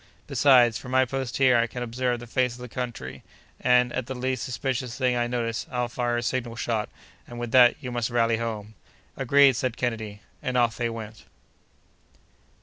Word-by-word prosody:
Besides, 125 -5 +4
from 130 - -10
my 130 0 +4
post 130 -1 -4
here, 130 -2 +5
I 115 0 +2
can 125 +1 -5
observe 120 +1 -1
the 120 - -9
face 125 0 0
of - - -14
the 125 - -7
country, 110 - -6 0.4
and, 125 -1 +3
at 130 -2 -3
the 130 - -5
least 130 -1 -2
suspicious 125 -1 -3
thing 125 -2 +1
I 120 0 0
notice, 115 -2 -2
I'll 125 -1 -2
fire 120 0 -1
a 120 - -2
signal 120 -1 -2
shot, 115 -2 -2 0.4
and 120 - -9
with 120 -1 -4
that 125 -1 +7
you 125 -3 -5
must 120 -1 -1
rally 115 -1 +2
home." 110 -2 -5 0.4
"Agreed!" 140 0 +5
said 130 -2 -2
Kennedy; 110 -4 -3 0.2
and 125 0 -2
off 120 -2 +2
they 120 -1 -1
went. 110 -1 -8
120 Hz, 190 wpm, -26 LUFS, 115-125 Hz, 0.4 s, that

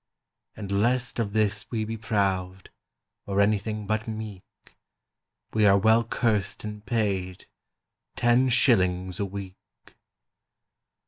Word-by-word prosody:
"And 100 -2 -6
lest 125 +2 0
of 105 -3 -1
this 105 -2 0
we 110 -2 -2
be 115 +1 -4
proud 95 -4 -2 0.6
Or 100 0 0
anything 105 +1 +1
but 110 +2 -2
meek, 110 -3 -6 1.1
We 110 -1 +4
are 100 0 +6
well 110 +3 +4
cursed 110 -4 -1
and 105 -1 -7
paid— 100 -5 -2 0.7
Ten 120 +2 +3
shillings 95 -8 +2
a 100 - 0
week!" 95 -1 -7
105 Hz, 115 wpm, -26 LUFS, 95-110 Hz, 1.1 s, are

